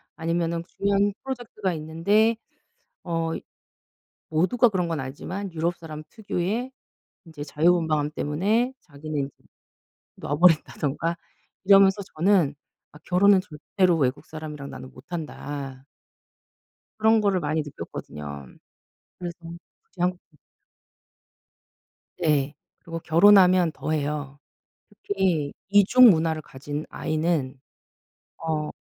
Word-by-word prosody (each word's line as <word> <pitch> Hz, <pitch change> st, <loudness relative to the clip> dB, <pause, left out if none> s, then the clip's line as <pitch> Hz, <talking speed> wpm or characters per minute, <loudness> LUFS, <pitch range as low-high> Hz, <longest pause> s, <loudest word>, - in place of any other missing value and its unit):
아니면은 165 Hz, 0 st, -1 dB
중요한 200 Hz, +1 st, +1 dB
프로젝트가 240 Hz, -7 st, -3 dB
있는데 170 Hz, +9 st, +2 dB, 0.7 s
어 165 Hz, -1 st, -1 dB, 1.0 s
모두가 205 Hz, +10 st, +3 dB
그런 180 Hz, -4 st, -1 dB
건 165 Hz, -3 st, -2 dB
아니지만 175 Hz, +9 st, -6 dB
유럽 170 Hz, +2 st, -1 dB
사람 155 Hz, -2 st, -8 dB
특유의 220 Hz, +4 st, -3 dB, 0.5 s
인제 160 Hz, -3 st, -9 dB
자유분방함 155 Hz, -1 st, +2 dB
때문에 210 Hz, -, 0 dB
자기는 145 Hz, -2 st, -5 dB, 0.8 s
놔 145 Hz, -, -3 dB
버린다든가 165 Hz, -1 st, +2 dB, 0.5 s
이러면서 195 Hz, 0 st, +6 dB
저는 170 Hz, -4 st, +3 dB, 0.4 s
'아 150 Hz, -, -14 dB
결혼은 190 Hz, +2 st, +5 dB
절대로 180 Hz, +2 st, 0 dB
외국 135 Hz, -3 st, -1 dB
사람이랑 150 Hz, -3 st, -7 dB
나는 130 Hz, -, -10 dB
못 -, -, -14 dB
한다.' 145 Hz, -5 st, -6 dB, 1.1 s
그런 220 Hz, 0 st, +4 dB
거를 200 Hz, -3 st, +2 dB
많이 155 Hz, -1 st, -1 dB
느꼈거든요. 75 Hz, -, -8 dB, 0.7 s
그래서 175 Hz, -1 st, -6 dB, 0.5 s
다시 190 Hz, -, -24 dB
한국으로 180 Hz, -3 st, -2 dB, 1.8 s
네. 150 Hz, -4 st, +1 dB, 0.3 s
그리고 165 Hz, 0 st, -6 dB
결혼하면 180 Hz, 0 st, +6 dB
더해요. 145 Hz, -2 st, -3 dB, 0.5 s
특히 190 Hz, -8 st, -1 dB, 0.2 s
2 205 Hz, +1 st, +6 dB
중 250 Hz, +3 st, +8 dB
문화를 160 Hz, -3 st, +2 dB
가진 145 Hz, +2 st, -6 dB
아이는 155 Hz, -4 st, -1 dB, 0.8 s
어 155 Hz, -2 st, -2 dB
165 Hz, 250 characters per minute, -25 LUFS, 150-190 Hz, 1.8 s, 중